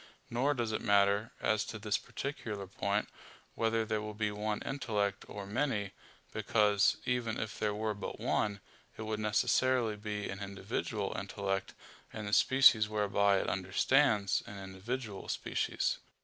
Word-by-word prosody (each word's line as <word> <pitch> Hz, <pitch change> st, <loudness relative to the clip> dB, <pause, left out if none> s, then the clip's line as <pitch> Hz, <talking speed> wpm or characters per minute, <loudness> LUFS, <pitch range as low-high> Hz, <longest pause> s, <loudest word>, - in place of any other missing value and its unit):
Nor 135 Hz, +5 st, +2 dB
does 120 Hz, -3 st, -1 dB
it 110 Hz, -, -1 dB
matter, 100 Hz, +1 st, +3 dB
as 110 Hz, -1 st, +2 dB
to 115 Hz, -, -6 dB
this 105 Hz, -1 st, 0 dB
particular 110 Hz, -8 st, -5 dB
point, 100 Hz, +2 st, -1 dB, 0.5 s
whether 115 Hz, 0 st, +1 dB
there 110 Hz, -1 st, -1 dB
be 105 Hz, -1 st, 0 dB
one 105 Hz, +1 st, -2 dB
intellect 105 Hz, -7 st, -1 dB
or 100 Hz, -1 st, -7 dB
many; 105 Hz, -2 st, -1 dB, 0.4 s
because, 105 Hz, -2 st, +3 dB
even 120 Hz, -2 st, 0 dB
if 110 Hz, -1 st, -4 dB
there 105 Hz, -1 st, 0 dB
were 110 Hz, 0 st, -1 dB
but 100 Hz, -, -6 dB
one, 100 Hz, -2 st, 0 dB, 0.4 s
it 110 Hz, -, -5 dB
would 110 Hz, 0 st, -2 dB
necessarily 115 Hz, +2 st, +2 dB
be 105 Hz, 0 st, -4 dB
an 95 Hz, -, -5 dB
individual 100 Hz, +1 st, -3 dB
intellect, 95 Hz, 0 st, -3 dB, 0.4 s
and 105 Hz, -2 st, -5 dB
the 105 Hz, -, -4 dB
species 115 Hz, -4 st, +6 dB
whereby 100 Hz, -1 st, +3 dB
it -, -, -1 dB
understands, 100 Hz, +3 st, +2 dB
an 105 Hz, -, -8 dB
individual 100 Hz, +3 st, -5 dB
species. -, -, -1 dB
105 Hz, 145 wpm, -33 LUFS, 100-115 Hz, 0.5 s, species